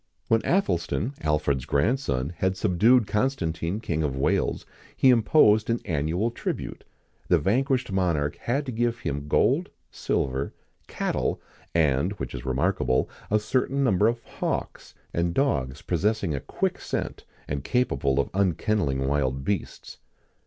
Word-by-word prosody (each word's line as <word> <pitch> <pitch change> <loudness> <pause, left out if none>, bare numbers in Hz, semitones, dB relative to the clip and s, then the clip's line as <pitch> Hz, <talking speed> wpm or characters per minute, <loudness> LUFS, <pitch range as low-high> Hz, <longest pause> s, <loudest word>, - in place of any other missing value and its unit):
When 115 0 +3
Athelstan, 110 - 0
Alfred's 75 -4 0
grandson, 70 - 0
had 95 +1 0
subdued 110 +6 +4
Constantine 100 -6 -1
King 85 -8 -2
of 70 -4 -1
Wales, 65 - 0 0.3
he 130 - +6
imposed 110 -2 +4
an 115 0 +1
annual 85 +8 0
tribute. - - -4 0.4
The - - +5
vanquished 125 - +1
monarch 85 -7 0
had 135 +5 -1
to 130 - -4
give 120 +1 -1
him 70 - -3
gold, - - +2 0.2
silver, 65 +1 -2 0.3
cattle, - - -1 0.4
and, 80 +3 +2
which 105 - -6
is 65 -1 -6
remarkable, 65 -1 +1 0.2
a 105 - +4
certain 130 +5 0
number 105 -4 +3
of 115 0 -1
hawks, - - -4 0.2
and 85 0 0
dogs 70 - 0
possessing 95 0 0
a 70 - -1
quick - - -2
scent, - - -4 0.2
and 70 -1 -3
capable 70 - +1
of 70 - 0
unkenneling 95 -7 +1
wild 65 -2 0
beasts. 100 +2 -4
90 Hz, 135 wpm, -26 LUFS, 70-115 Hz, 0.4 s, he